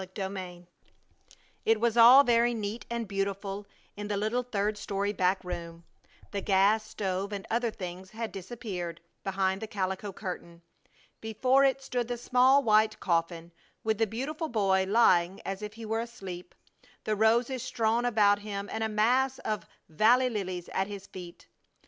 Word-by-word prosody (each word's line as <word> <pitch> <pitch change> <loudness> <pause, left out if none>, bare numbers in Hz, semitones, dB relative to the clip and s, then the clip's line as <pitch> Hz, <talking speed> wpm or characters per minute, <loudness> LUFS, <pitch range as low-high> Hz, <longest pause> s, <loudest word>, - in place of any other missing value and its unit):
CHAPTER 190 +1 -5
VIII 180 -2 -7 1.0
It 225 -1 +3
was 235 0 +1
all 240 +4 +9
very 240 -1 +3
neat 215 +1 -5
and 235 -1 -3
beautiful 195 0 -3 0.3
in 205 0 -6
the 205 -1 -1
little, 220 +5 0
third 215 -3 -1
story 205 0 -2
back 185 0 +1
room. 170 -2 -6 0.5
The 200 - -2
gas 200 +3 +3
stove 195 -1 -3
and 200 -1 -5
other 235 +1 +1
things 185 -2 -7
had 225 +1 -5
disappeared 190 -4 -6 0.2
behind 190 0 0
the 220 - -4
calico 190 0 -3
curtain. 175 -3 -7 0.6
Before 255 +5 +2
it 270 0 +2
stood 245 -3 -2
the 245 0 -3
small 255 +3 +4
white 215 -1 +3
coffin, 170 -1 -1 0.3
with 220 -1 0
the 225 - +3
beautiful 295 - -4
boy 195 -4 +2
lying 190 -4 +4
as 195 +1 -4
if 210 0 -6
he 230 0 -8
were 225 +1 -1
asleep, 190 -7 -8 0.5
the 215 - 0
roses 235 +4 +2
strewn 230 +1 0
about 210 -4 +3
him, 205 -1 -5
and 220 - -2
a 220 - 0
mass 250 +5 +2
of 210 -5 -4 0.2
valley 245 +10 +3
lilies 185 -5 -4
at 195 - -1
his 200 -1 -8
feet. 180 -3 -11
210 Hz, 160 wpm, -29 LUFS, 190-230 Hz, 1.0 s, all